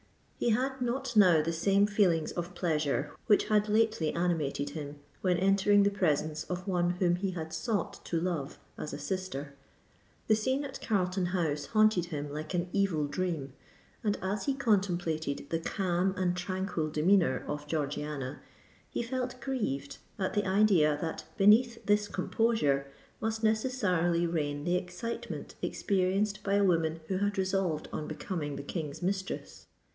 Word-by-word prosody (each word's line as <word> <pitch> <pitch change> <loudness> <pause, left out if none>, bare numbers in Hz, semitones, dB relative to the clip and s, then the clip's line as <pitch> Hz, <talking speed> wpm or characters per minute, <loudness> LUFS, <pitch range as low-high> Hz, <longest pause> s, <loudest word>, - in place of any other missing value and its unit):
He - - +2
had 260 +3 0
not 245 0 -2
now 180 -7 +6
the 165 +2 -1
same 195 +4 +3
feelings 190 -7 +2
of 175 0 -5
pleasure 150 -4 0 0.2
which 210 -3 +5
had 210 0 +3
lately 215 -7 +2
animated 160 -5 -1
him, 145 -2 -6 0.3
when 180 -2 +2
entering 200 +2 +4
the 200 - +3
presence 155 -5 0
of 180 +1 -5
one 175 -2 +2
whom 175 -1 +2
he 195 +1 -1
had 160 -3 -5
sought 215 -8 -2
to 165 - 0
love 165 -5 -2 0.2
as 150 - -4
a - - -5
sister: 185 -7 -4 0.7
the 220 - +4
scene 260 +6 0
at 270 - -7
Carlton 185 -3 0
House 160 -5 -1
haunted 215 -5 +3
him 145 -4 -5
like 155 +4 -4
an 175 0 0
evil 185 -7 +1
dream;—and 165 +5 -4
as 195 +2 -2
he 275 - +1
contemplated 175 - 0
the 165 - +1
calm 185 +1 0
and 180 -1 +1
tranquil 180 -3 -2
demeanour 160 -3 +2
of 150 0 -4
Georgiana, 145 -3 -3 0.5
he - - -2
felt 250 +1 -3
grieved 210 - -3 0.2
at 190 -2 -1
the 205 -2 0
idea 190 -7 +4
that 160 0 -4
beneath 230 +4 +5
this 205 0 +3
composure 200 -13 +1 0.3
must 220 0 -2
necessarily 205 -7 +2
reign 145 -4 -1
the 175 +3 +2
excitement 185 0 -5
experienced 195 +2 0
by 200 -1 0
a 200 - +4
woman 165 -3 +2
who 190 - +1
had 205 0 0
resolved 190 -4 0
on 150 - -3
becoming 150 -7 -4
the 140 - -6
King's 150 +1 -5
mistress. 190 +1 -3
180 Hz, 155 wpm, -30 LUFS, 155-205 Hz, 0.7 s, now